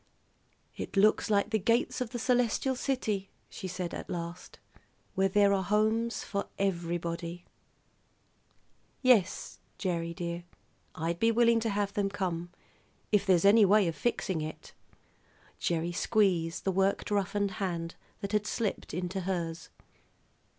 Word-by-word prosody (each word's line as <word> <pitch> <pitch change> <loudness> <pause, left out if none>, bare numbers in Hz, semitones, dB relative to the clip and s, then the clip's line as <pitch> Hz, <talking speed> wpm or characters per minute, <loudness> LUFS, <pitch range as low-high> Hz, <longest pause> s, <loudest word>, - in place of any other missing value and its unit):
"It - - -6
looks 215 +3 +4
like 205 +1 +2
the 220 - +2
gates 235 +5 +1
of 250 - -1
the 240 - -4
celestial 245 +2 +1
city," 220 -7 -1 0.2
she 190 - -6
said 180 -1 -4
at - - -6
last, 170 0 -6 0.6
"where 195 0 +2
there 200 +1 +4
are 195 - +2
homes 220 +4 +1
for 200 -2 -3
everybody. 170 -2 -2 1.6
Yes, 225 -8 +3 0.2
Gerry, 170 -3 -2
dear, 170 -1 -4 0.5
I'd 165 +1 -2
be 225 - +4
willing 235 0 +4
to 225 0 -1
have 200 -1 -1
them 200 -1 0
come, 175 -4 -3 0.6
if 205 -1 +3
there's 185 -1 +4
anyway 205 -1 +6
of 165 -2 -1
fixing 190 -8 -1
it." 155 +1 -7 0.9
Gerry 170 0 0
squeezed 175 -4 +1
the 190 - +1
work 195 +1 +1
roughened 200 0 0
hand 170 -3 -2 0.3
that 200 - -4
had 210 -1 +1
slipped 210 -8 -2
into 180 +2 -2
hers. 170 -3 -3
195 Hz, 135 wpm, -30 LUFS, 175-215 Hz, 1.6 s, anyway